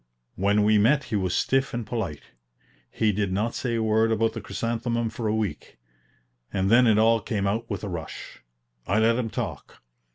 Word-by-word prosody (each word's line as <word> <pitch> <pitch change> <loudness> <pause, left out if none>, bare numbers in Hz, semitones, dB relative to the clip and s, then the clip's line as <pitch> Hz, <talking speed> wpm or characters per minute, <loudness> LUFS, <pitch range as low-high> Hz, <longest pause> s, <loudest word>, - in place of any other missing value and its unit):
When 100 +2 +2
we 105 0 +4
met 135 +7 +3
he - - +2
was 95 -3 0
stiff 135 -1 +1
and 120 -2 -3
polite. 105 -10 -4 0.7
He 110 -1 +1
did 100 -1 -1
not 105 +5 -1
say 120 -2 -2
a 115 - 0
word 110 +1 +2
about 115 0 +1
the 115 - -6
chrysanthemum 115 +2 -2
for 115 - -4
a 105 - +1
week, 110 -3 -4 0.7
and 95 +1 0
then 125 +1 +6
it 110 -2 +4
all 115 +1 +4
came 100 -2 -2
out 110 +4 -1
with 100 -2 -4
a - - -3
rush. 85 -5 -7 0.5
I 100 - +1
let 115 +1 +4
him 120 -3 -2
talk. - - -6
110 Hz, 195 wpm, -25 LUFS, 100-115 Hz, 0.7 s, then